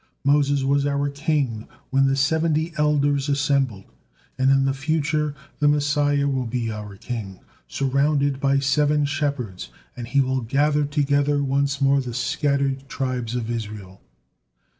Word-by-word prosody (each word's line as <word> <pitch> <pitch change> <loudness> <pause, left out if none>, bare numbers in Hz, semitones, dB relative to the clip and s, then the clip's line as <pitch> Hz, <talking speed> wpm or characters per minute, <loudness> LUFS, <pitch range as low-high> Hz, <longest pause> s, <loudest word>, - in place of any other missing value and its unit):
Moses 140 -1 +2
was 140 +1 +2
our 145 0 0
king 140 -6 -1 0.2
when 135 0 +3
the 135 - +2
seventy 160 +3 +1
elders 145 -1 +1
assembled, 140 -7 0 0.5
and 130 0 +2
in 135 0 +4
the 135 - +1
future 150 +1 -1 0.2
the 150 - +3
Messiah 145 -1 +2
will 130 -3 -1
be 115 -1 -2
our 105 -2 -7
king, 100 -5 -6 0.3
surrounded 140 - +1
by 140 0 +2
seven 145 +2 +2
shepherds, 140 -9 -3 0.3
and 120 -1 -7
he 140 +4 +1
will 130 -1 +1
gather 145 +5 +1
together 145 0 +1
once 140 +1 0
more 140 0 +3
the 125 -3 -6
scattered 140 0 -1
tribes 125 -3 -3
of 120 -1 -3
Israel." 105 -4 -6
140 Hz, 140 wpm, -23 LUFS, 130-145 Hz, 0.5 s, in